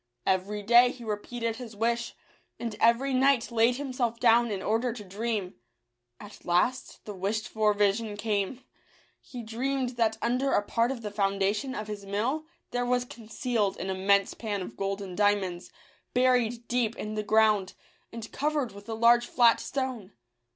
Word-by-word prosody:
Every 200 +3 0
day 240 +3 +6
he 245 -1 -9
repeated 225 +2 -3
his 230 -3 -9
wish, 235 +2 -1 0.4
and 230 -3 -4
every 240 +4 +3
night 260 -2 +3
laid 235 +1 +3
himself 255 -4 -2
down 235 0 +4
in 200 -3 -3
order 230 +2 0
to 220 -3 -8
dream. 205 -1 -3 0.7
At 205 0 -12
last 210 +9 0
the 210 - -6
wished 200 +3 -2
for 215 -1 +2
vision 205 +1 +1
came. 215 +3 -2 0.6
He 245 -4 -9
dreamed 250 +2 -2
that 225 -2 +1
under 255 +3 0
a 205 - +3
part 230 +3 +1
of 245 -4 -6
the 210 - -4
foundation 200 +5 0
of 215 - -4
his 210 -1 -6
mill 235 +11 -2 0.2
there 245 0 -1
was 245 0 +1
concealed 225 -3 -2
an 190 +2 -3
immense 195 +1 +2
pan 205 -4 -4
of - - -9
gold 195 0 -3
and 185 -2 -7
diamonds, 200 -3 0 0.5
buried 245 -2 +2
deep 240 -2 0
in 215 -2 -5
the 215 - -1
ground, 215 -3 +2 0.4
and 230 -1 -8
covered 295 -4 -1
with 200 +2 -13
a 225 - -2
large 235 +1 +4
flat 235 -2 +4
stone. 255 -8 -4
225 Hz, 165 wpm, -28 LUFS, 205-245 Hz, 0.7 s, day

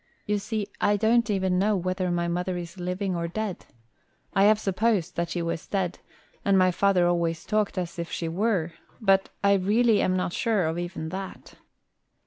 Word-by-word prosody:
You 210 0 0
see, 215 0 -3 0.2
I 205 - +3
don't 225 +2 +3
even 190 -3 +1
know 210 +2 +2
whether 185 0 -1
my 175 0 0
mother 180 +1 -2
is 175 +1 -7
living 180 +1 -2
or 170 0 -2
dead. 205 +1 -4 0.7
I 195 - +4
have 215 +1 +6
supposed 205 -2 0
that 170 0 -1
she 170 0 -2
was 165 -1 -3
dead, 190 -3 -2 0.4
and 200 -1 +3
my 185 -1 +4
father 185 -1 +3
always 170 -2 0
talked 215 -2 0
as 175 -1 -3
if 170 - -4
she 165 - -3
were; 175 -1 0 0.3
but 195 -4 +3
I 200 0 +5
really 210 +4 +3
am 185 - +1
not 180 -1 -2
sure 215 -6 +1
of 160 +2 -1
even 175 -2 -4
that." 190 +2 -7
185 Hz, 185 wpm, -26 LUFS, 175-205 Hz, 0.7 s, have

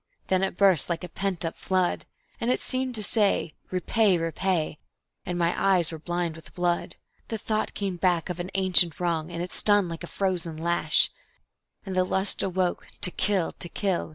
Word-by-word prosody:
then 185 -1 +3
it 195 -2 -1
burst 190 -7 +5
like 170 +1 -2
a - - -4
pent 185 -1 -2
up 165 - -3
flood; 185 -2 0 0.3
And 235 - -1
it 255 - +2
seemed 255 -1 -2
to 215 - 0
say, 200 -7 +1 0.2
"Repay, 190 +1 +2
repay," 165 -1 -1 0.5
and 175 - -2
my 170 0 +2
eyes 180 -4 +2
were 160 - -6
blind 175 0 -2
with 160 - -14
blood. 175 -1 0 0.3
The 225 - -3
thought 215 +1 -2
came 195 -3 -2
back 175 -3 +1
of 180 -1 -5
an 175 +1 -4
ancient 185 -4 +4
wrong, 170 -2 -1
and 170 0 -4
it 180 - -7
stung 205 -3 +3
like 165 0 -6
a - - -5
frozen 175 -5 -1
lash, 170 +2 +3 0.7
And 190 -2 -4
the 185 - +4
lust 190 +2 0
awoke 185 -1 -1
to 180 - 0
kill, 190 -3 +1
to 175 - -3
kill... 190 -3 -1
180 Hz, 190 wpm, -26 LUFS, 170-195 Hz, 0.7 s, burst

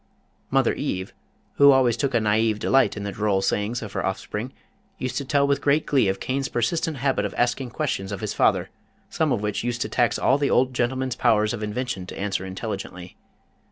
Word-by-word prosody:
Mother - - +2
Eve, 95 +1 -3 0.4
who 140 0 +8
always 130 -4 +4
took 135 +1 -1
a - - +5
naïve 110 0 +2
delight 135 +1 +2
in 100 - -4
the 100 - -3
droll 100 -1 0
sayings 105 +5 -1
of 105 - -8
her - - -2
offspring, 105 +5 -3 0.5
used 130 - -4
to 140 - -2
tell 140 0 +2
with 140 0 +1
great 145 +2 +2
glee 135 -7 +2
of 95 0 -1
Cain's 135 +1 -2
persistent 155 +6 -1
habit 135 -5 0
of 105 - -4
asking 125 +1 0
questions 115 -8 -3
of 100 - -5
his - - -3
father, - - +2 0.4
some 155 -2 +1
of 105 -4 0
which 105 -1 -2
used 120 0 -2
to - - -1
tax 120 -1 +1
all 135 +2 +2
the 145 - +1
old 130 +1 +2
gentleman's 130 0 -1
powers 110 -3 +2
of 115 - -5
invention 105 -2 -3
to - - -8
answer 95 -1 -2
intelligently. 95 -2 -6
120 Hz, 205 wpm, -24 LUFS, 105-130 Hz, 0.5 s, who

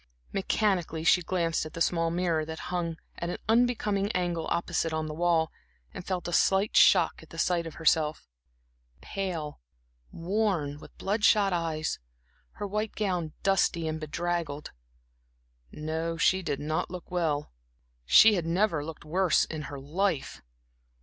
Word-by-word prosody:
Mechanically, 190 -5 0
she 180 +2 +5
glanced 170 -2 0
at 155 - -8
the - - -6
small 165 0 +1
mirror, 170 -2 0
that 160 +1 -6 0.2
hung 170 -2 -2 0.2
at 170 - -3
an - - -3
unbecoming 220 -3 +2
angle 175 -2 -1
opposite 170 -1 -1
on 160 0 -1
the 155 - -5
wall, 165 -1 +1 0.4
and - - -7
felt 180 -1 -3
a 175 - -4
slight 190 +4 +3
shock - - +5
at - - -16
the - - -11
sight 170 -2 +1
of 160 - -9
herself 160 -1 +1 0.7
pale, 170 -7 -4 0.5
worn, 170 -6 -1
with - - -15
blood 210 +2 -2
shot 205 -4 +4
eyes, 165 -2 -2 0.5
her - - -5
white 210 +2 -3
gown 180 -7 -1
dusty 185 -4 +2
and 155 0 -3
bedraggled. 160 -1 -3 1.0
No, 160 +2 -3
she 190 +3 +3
did 145 -6 -3
not 155 +2 -2
look 180 0 -9
well 160 -5 -1 0.5
she 220 - +7
had 175 -4 -1
never 170 -3 +1
looked 160 0 -8
worse 180 +2 +2
in 155 -1 -6
her 140 - -7
life. 160 +3 -2
170 Hz, 150 wpm, -28 LUFS, 160-190 Hz, 1.0 s, she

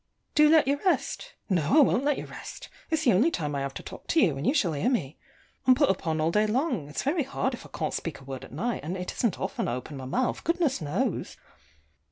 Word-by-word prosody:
Do 300 0 +6
let 315 -3 +5
you 285 +1 +1
rest? - - -1
No, 175 - +2
I - - +9
won't 265 -2 +3
let 290 -1 +2
you - - -5
rest. - - -9 0.2
It's 320 -1 0
the 245 - +5
only 230 - +4
time 150 - -3
I 140 - -1
have 135 0 -4
to - - -7
talk - - -10
to 330 - +3
you, 170 - +4
and 135 - -3
you - - +4
shall 185 - +2
hear 145 - +1
me. 165 - -2 0.5
I'm 255 - +8
put 285 -3 +4
upon 160 -4 -2
all 160 +2 +2
day 210 +3 +3
long: 235 - -1
it's 150 - -3
very 305 +4 +1
hard 270 0 -1
if - - -8
I - - -25
can't - - -3
speak 165 - -4
a - - -15
word 135 -1 -7
at - - -11
night; 205 - -2
and 175 +5 -3
it 180 0 -4
isn't 225 -8 -1
often 190 - -2
I 120 - -1
open 130 +3 -7
my 130 - -7
mouth, 245 - -1
goodness 335 - +1
knows! 145 -1 -2
210 Hz, 260 wpm, -27 LUFS, -, 0.5 s, I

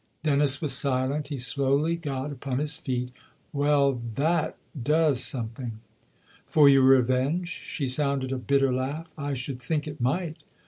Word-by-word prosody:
Dennis 140 -2 +3
was 145 -4 +2
silent; 135 +2 +1
he 145 - -4
slowly 140 +5 0
got 145 -4 -4
upon 135 -1 -4
his 150 +1 +1
feet. 125 -2 -3 0.2
" - - -39
Well, 140 -3 +2
that 160 +3 0 0.2
does 150 0 +2
something." 120 -1 -2 0.4
" - - -31
For 150 -2 +7
your 135 -1 +6
revenge? 130 +6 +3
" - - -15
She 140 - -2
sounded 135 0 0
a 135 - -2
bitter 135 0 +2
laugh. 140 +6 -3
" - - -36
I 145 -2 -3
should 130 0 -5
think 150 +4 -2
it 145 -3 -7
might 160 +6 -1
140 Hz, 170 wpm, -26 LUFS, 130-150 Hz, 0.4 s, For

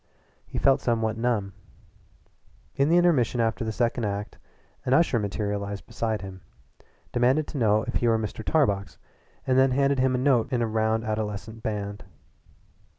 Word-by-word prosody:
He - - -6
felt 135 - +3
somewhat 115 -2 0
numb. 115 -4 -1 1.2
In 140 +2 +2
the 170 - +5
intermission 150 -9 +3
after 115 +1 0
the 110 - -2
second 120 +1 0
act 100 0 -4 0.4
an 130 - +2
usher 160 -7 +3
materialized 100 0 -3
beside 110 -3 -3
him, 95 -1 -9 0.7
demanded 130 +5 +2
to 145 - -4
know 110 -1 +3
if - - -5
he 120 - +1
were 115 -1 +3
Mr. 110 0 -5
Tarbox, 100 -12 0 0.5
and 130 0 +3
then 135 0 +5
handed 140 +1 +2
him 130 0 +2
a - - +1
note 125 -3 +3
written - - -3
in 120 - 0
a - - 0
round 110 0 0
adolescent 110 0 -4
band. 105 -2 -4
115 Hz, 165 wpm, -26 LUFS, 105-130 Hz, 1.2 s, the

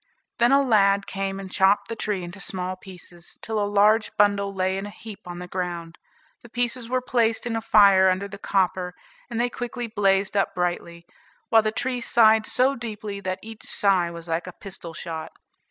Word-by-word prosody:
Then 240 +1 +4
a 280 0 +5
lad 200 -5 +3
came 195 0 -4
and 190 -1 -8
chopped 200 +1 +3
the 230 - -5
tree 210 -4 -3
into 175 +3 -9
small 185 -1 -4
pieces, 180 -2 -12
till 220 -1 -2
a 205 - 0
large 210 +2 +4
bundle 200 -1 +3
lay 190 -1 -1
in 195 +1 -4
a - - -7
heap 205 -1 -10
on 175 0 -7
the 180 0 -7
ground. 175 -2 -5 0.4
The 235 - -15
pieces 240 0 -2
were 255 0 0
placed 230 -3 +1
in 235 -1 -2
a 225 - -1
fire 200 -4 +6
under 185 +2 -1
the 200 0 -10
copper, 185 -2 0 0.3
and 235 -1 -3
they 240 - +2
quickly 245 0 -5
blazed 200 -3 +1
up 195 - +1
brightly, 175 -1 -3 0.4
while 225 - +6
the 215 0 -1
tree 250 +3 -2
sighed 220 -2 +4
so 265 +2 +2
deeply 215 -4 -6
that 185 -1 -3
each 225 0 -10
sigh 190 -4 +2
was 170 0 -9
like 165 +2 -2
a 180 - -7
pistol 175 -4 -9
shot. 160 -1 -6
200 Hz, 200 wpm, -24 LUFS, 185-225 Hz, 0.4 s, fire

